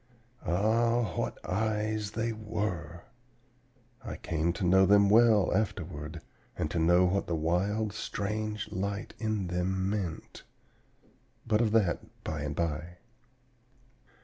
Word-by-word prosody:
Ah, 110 +3 +2
what - - -2
eyes 105 +1 -1
they 115 +1 -1
were! 90 -6 -4 1.0
I - - -5
came 80 +1 -1
to 85 - -5
know 95 +2 +5
them 100 0 +5
well 110 -4 +5
afterward, 85 -7 -3 0.4
and 75 - -2
to 85 - 0
know 85 +3 +5
what 95 +2 0
the 85 - 0
wild, 95 +7 0
strange 105 +1 -3
light 100 +2 -3
in 110 -3 -1
them 95 +2 -1
meant; 95 -6 -4 1.0
but 110 -1 +2
of 110 -3 +2
that 100 -7 0
by 80 -2 -3
and 75 -1 -3
by. 85 +1 -3
100 Hz, 120 wpm, -30 LUFS, 85-110 Hz, 1.0 s, know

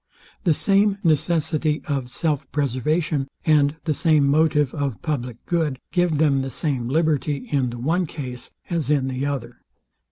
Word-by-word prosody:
The 165 -4 +4
same 200 +2 +3
necessity 155 -1 +1
of 135 -4 -2
self 145 0 -2
preservation, 145 +2 0 0.2
and 150 -2 +4
the 155 - 0
same 155 -2 +3
motive 150 -1 +3
of 140 -6 -2
public 125 -6 -3
good, 160 -6 0
give 175 -4 +2
them 145 -3 +3
the 135 - -3
same 130 -2 -2
liberty 150 -2 0
in 135 -4 +1
the 120 - -6
one 165 +8 0
case 125 -5 -7 0.2
as 165 -5 -2
in 140 -3 +2
the 130 +2 -2
other. 140 -3 -5
150 Hz, 155 wpm, -23 LUFS, 135-160 Hz, 0.2 s, The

